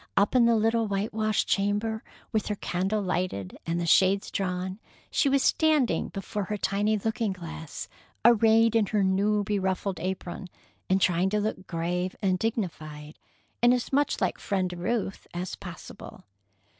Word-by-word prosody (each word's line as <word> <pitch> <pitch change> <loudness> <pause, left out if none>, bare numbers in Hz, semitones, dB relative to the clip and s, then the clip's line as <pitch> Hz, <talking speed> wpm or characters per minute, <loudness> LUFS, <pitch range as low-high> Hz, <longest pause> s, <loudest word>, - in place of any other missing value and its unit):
Up 200 +5 +3
in 250 -2 +5
the 235 0 +4
little 225 +1 +2
whitewashed 215 +1 0
chamber, 205 +2 0 0.3
with 220 -2 0
her 210 - -1
candle 195 +3 -1
lighted 175 - -2
and 170 +1 0
the 170 - -1
shades 190 +3 +3
drawn, 185 0 -2 0.3
she 280 - +3
was 275 0 +3
standing 310 -6 +2
before 195 +1 -4
her 210 +3 -3
tiny 205 +3 +1
looking 220 0 -1
glass, 165 -3 -7 0.4
arrayed 225 0 +5
in 220 -3 +3
her 210 -1 +1
new, 205 +2 +2
beruffled 190 -2 -1
apron, 185 +1 -4 0.4
and 190 +1 +3
trying 180 +1 +3
to 210 +1 +1
look 205 -3 -3
grave 180 +2 -2
and 185 -3 +1
dignified, 155 -9 -4 0.4
and 240 +1 +6
as 250 +2 -4
much 285 +1 +2
like - - 0
Friend 185 -3 -1
Ruth 195 +3 -2
as 180 +1 -3
possible. - - -10
200 Hz, 155 wpm, -27 LUFS, 185-220 Hz, 0.4 s, and